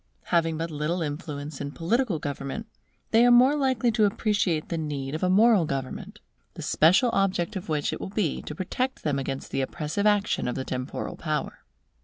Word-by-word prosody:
Having 165 -2 +2
but 165 +1 -3
little 155 +4 -1
influence 145 -2 -5
in 140 0 -5
political 215 +3 0
government, 145 +6 -5 0.5
they 225 - +5
are - - +6
the 240 0 +7
more 260 +4 +5
likely 260 -4 +1
to 220 -1 +3
appreciate 205 -6 0
the 170 - -2
need 140 -3 -4
of 155 - -3
a 185 - +2
moral 210 0 +5
government, 135 -2 -5 0.4
the - - -7
special 185 - +4
object 195 -2 0
of 185 -3 -5
which 150 -2 0
it - - -5
will - - -4
be 195 -6 -1
to 150 - -7
protect 255 +9 -3
them 145 -2 0
against 135 0 -5
the - - 0
oppressive 155 +9 -1
action 205 -7 +2
of 125 - -2
the 130 - -3
temporal 130 0 -4
power. - - -3
170 Hz, 195 wpm, -26 LUFS, 150-210 Hz, 0.5 s, the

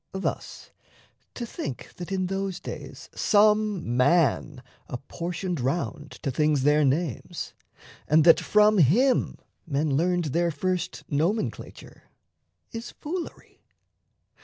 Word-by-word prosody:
Thus, 190 0 -4 0.6
to 240 - -4
think 140 - -6
That 180 +1 -7
in 190 -1 0
those 195 0 -3
days - - -8
some 210 - +2
man 145 -1 +2 0.3
apportioned 170 +6 -4
round 145 +2 -2
To 140 - -1
things 150 0 +1
their 150 +1 +4
names, 140 -1 -2 0.5
and 155 +1 +5
that 165 0 +7
from 210 -1 +4
him 235 - +3 0.3
men 145 -1 0
learned 175 +3 +1
Their 170 0 +2
first 180 +3 -2
nomenclature, 170 +9 -3 0.7
is 230 +1 -6
foolery. 340 +3 -7
170 Hz, 110 wpm, -26 LUFS, 150-195 Hz, 0.7 s, that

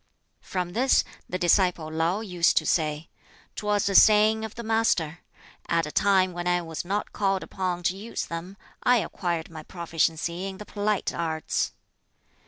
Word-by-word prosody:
From 180 -2 -3
this, 260 +5 +3 0.3
the 185 - -2
disciple 175 -3 +2
Lau 165 +6 0
used 180 -6 +1
to 155 - +3
say, 155 0 0 0.4
"'Twas 210 -1 0
a 200 - 0
saying 215 +2 +6
of 220 -1 -6
the 235 - -6
Master: 220 -8 +1 0.5
'At 165 -1 +2
a 150 - -6
time 190 -1 +3
when 175 0 -4
I 175 0 +3
was 165 -1 -5
not 200 +4 -3
called 195 -2 0
upon 180 -2 -3
to 180 +1 +1
use 215 +4 -5
them, 175 +4 -7 0.2
I 250 - +4
acquired 170 -6 -3
my 160 -1 -8
proficiency 170 +2 -2
in 190 -1 -7
the 210 - -9
polite 205 -1 -1
arts.'" 160 -2 -2
180 Hz, 165 wpm, -26 LUFS, 165-205 Hz, 0.5 s, saying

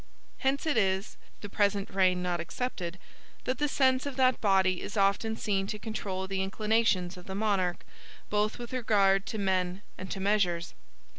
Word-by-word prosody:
Hence 275 +2 0
it 310 -6 +1
is 190 -1 +1 0.3
(the 205 - -6
present 200 -1 0
reign 185 -2 +2
not 175 -1 -1
excepted) 175 0 -4 0.5
that 255 0 -2
the 295 - +2
sense 260 -1 +2
of 280 - -5
that 255 -1 +3
body 190 -3 +3
is - - -6
often 200 +3 +2
seen 195 -2 0
to 210 - -4
control 200 -3 -4
the 190 0 -1
inclinations 195 -2 +1
of 180 - -12
the 190 - -5
monarch, 195 -4 0 0.4
both 210 +1 0
with 240 0 -8
regard 200 -5 +3
to 220 - -3
men 190 -1 0 0.2
and 185 - -6
to 195 - -4
measures. 190 -4 +1
200 Hz, 170 wpm, -29 LUFS, 190-220 Hz, 0.5 s, that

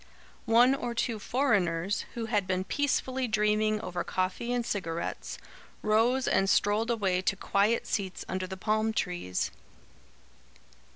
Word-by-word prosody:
One 240 +3 +6
or 240 -3 -3
two 230 -1 -1
foreigners, 200 -7 +1
who 230 -1 -3
had 210 -4 0
been 185 0 0
peacefully 265 0 0
dreaming 215 0 +2
over 180 -4 -3
coffee 185 +6 -2
and 245 -1 0
cigarettes, 170 -6 -3 0.5
rose 230 +5 +2
and 195 +1 +2
strolled 210 +4 +2
away 195 -6 +1
to 190 - 0
quiet 200 +3 +1
seats 190 -3 -3
under 185 0 -3
the 190 0 -6
palm 215 +2 0
trees. 175 - -2
210 Hz, 130 wpm, -29 LUFS, 185-235 Hz, 0.5 s, One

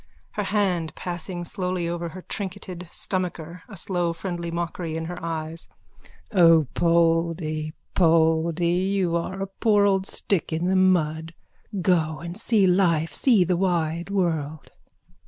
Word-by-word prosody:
(Her 210 - -3
hands 190 -6 0
passing 175 0 -4
slowly 180 -1 -2
over 170 0 -3
her 185 +2 -10
trinketed 185 -3 -6
stomacher, 175 -2 -2
a 200 - -8
slow 175 -1 +1
friendly 170 -1 -4
mockery 170 -1 -3
in 160 - -4
her 175 0 -7
eyes.) 165 0 -5 0.6
O 165 -6 +6
Poldy, 165 -2 +1 0.2
Poldy, 165 0 +3 0.3
you 180 -4 +1
are 190 +3 -2
a - - -4
poor 210 -3 +4
old 195 -1 +2
stick 195 -5 -2
in 160 +2 -1
the 190 +1 +2
mud! 165 -3 +2 0.5
Go 160 -3 +2
and 170 +2 -7
see 215 -1 +3
life. 175 -4 +2
See 230 -8 +4
the 180 +1 +1
wide 170 -2 0
world. 160 -6 -2
170 Hz, 135 wpm, -24 LUFS, 165-185 Hz, 0.6 s, O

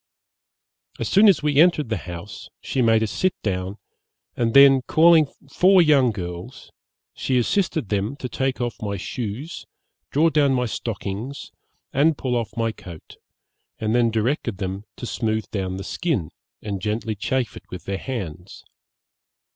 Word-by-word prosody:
As - - -2
soon 205 +2 +6
as 185 - +3
we 150 -2 +1
entered 155 -5 +4
the 110 - 0
house, 90 +3 -8
she 130 - -2
made 115 -1 +4
us 105 - -2
sit 185 - 0
down, 95 0 -2 0.6
and 115 0 0
then 140 -1 +8
calling 160 -1 +6 0.3
four 190 +1 +5
young 145 -7 +5
girls, 90 -4 -7 0.4
she 130 - -1
assisted 165 - 0
them 105 +5 -1
to 130 - -5
take 130 +2 -2
off 120 -1 -3
my 100 -2 -3
shoes, 120 - -5 0.5
draw 160 +3 +3
down 140 -3 +3
my 125 -1 +1
stockings, 110 +3 -5 0.4
and 150 +2 +3
pull 125 -2 -1
off 115 -1 -3
my 115 -1 +1
coat, 85 -6 -12 0.6
and 110 0 -1
then 120 -1 +3
directed 115 -1 -1
them 95 +2 -4
to - - -7
smooth 110 -3 -1
down 95 -2 -3
the 95 - -5
skin, 135 - -2 0.3
and 100 -3 -4
gently 110 +2 -2
chafe 115 +2 -2
it - - -13
with 90 - -8
their 95 0 -3
hands. 95 - -6
115 Hz, 155 wpm, -23 LUFS, 100-140 Hz, 0.6 s, then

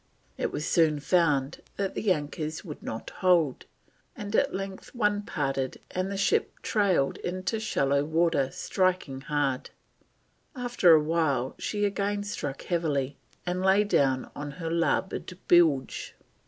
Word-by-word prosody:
It - - -2
was 150 - -3
soon 155 -3 +3
found 150 -3 +1
that 195 -1 -2
the 210 - 0
anchors 155 0 -3
would 150 -4 -8
not 110 - -6
hold, 170 -7 +2 0.5
and 205 +1 -4
at - - +3
length 195 +4 -6
one 210 -3 +1
parted 135 -8 -2
and 185 +1 -2
the 200 - -3
ship 200 - +1
"trailed 190 -10 +2
into 185 +5 -3
shallow 140 -10 +1
water, 160 -3 +2
striking 180 -6 -1
hard." 135 -2 -1 0.9
After 240 -9 +5
a 155 - +3
while 150 -5 0
she 205 -1 -1
again 205 0 -1
struck 145 -9 -4
heavily, 145 -6 -1 0.3
and 180 +1 -1
"lay 190 +2 +4
down 135 -10 +1
on 145 0 -5
her 165 +2 -4
larboard 175 +2 -1
bilge." 155 -7 +3
170 Hz, 140 wpm, -28 LUFS, 145-190 Hz, 0.9 s, After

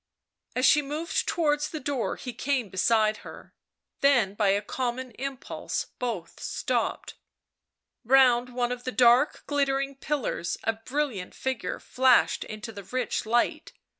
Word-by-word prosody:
As 255 - +2
she 295 - +6
moved 300 +4 -2
towards 295 -3 +1
the 310 - -5
door 275 -4 -2
he 250 - -7
came 260 -6 -1
beside 215 +3 +2
her. - - -12 0.5
Then 245 -9 +3
by 205 0 +1
a 200 +2 +2
common 255 0 -3
impulse 270 +3 -4
both 220 -9 -4
stopped. - - -2 0.9
Round 250 -1 +5
one 245 -1 0
of 250 0 -5
the 255 - -3
dark 250 +3 +4
glittering 275 -1 0
pillars 270 - -2
a 225 - +1
brilliant 225 -4 -3
figure 255 -9 -3
flashed 255 -1 +3
into 215 +1 -7
the 200 -2 -9
rich 255 0 -2
light. 235 +2 0
250 Hz, 135 wpm, -27 LUFS, 225-275 Hz, 0.9 s, she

